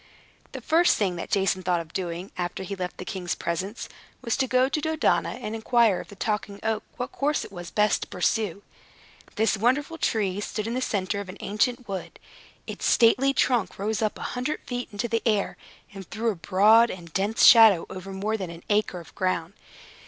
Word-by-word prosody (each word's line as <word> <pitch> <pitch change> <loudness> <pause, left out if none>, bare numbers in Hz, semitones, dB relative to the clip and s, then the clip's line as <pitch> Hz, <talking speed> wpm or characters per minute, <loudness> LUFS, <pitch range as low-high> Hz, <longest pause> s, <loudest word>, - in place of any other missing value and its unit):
The - - -6
first 335 +3 +3
thing 190 -4 0
that - - -6
Jason 190 -2 +1
thought 180 -1 +1
of 165 -1 -9
doing, 180 0 -4
after 175 +1 -4
he 200 +2 -5
left 180 -1 -5
the 185 - -7
king's 180 -2 -3
presence, 185 +6 -4 0.4
was 235 -3 0
to 265 -1 +1
go 255 +1 +3
to 300 +3 -2
Dodona, 315 +1 +1
and 240 -3 -6
inquire 225 -2 +2
of - - -8
the 200 - -12
Talking 205 0 -3
Oak 220 -1 0 0.2
what 250 +1 -4
course 295 +2 -1
it - - -12
was 175 -3 -8
best 210 +1 +2
to - - -5
pursue. 200 +1 -1 0.7
This 220 0 +2
wonderful 275 +9 0
tree 205 -3 0
stood 210 0 -4
in 230 - -3
the 255 - -1
center 200 -3 -1
of 200 -2 -7
an 185 - -8
ancient 235 +4 -1
wood. 190 -2 -6 0.5
Its - - -7
stately 255 +4 +4
trunk 245 -7 +1
rose 215 +2 -2
up 215 -1 -1
a - - -7
hundred 255 +5 -3
feet 245 -1 -5
into 205 +3 -3
the 230 -1 0
air, 210 -4 +1 0.4
and 195 -3 -10
threw 225 +1 -1
a - - -6
broad 210 +7 +5
and 170 -3 -9
dense 205 +3 +2
shadow 220 -7 +8
over 190 +1 -8
more 205 +3 -2
than 190 -4 -5
an 170 0 -10
acre 205 -3 +1
of 165 - -16
ground. 185 -1 -1
210 Hz, 205 wpm, -26 LUFS, 185-235 Hz, 0.7 s, shadow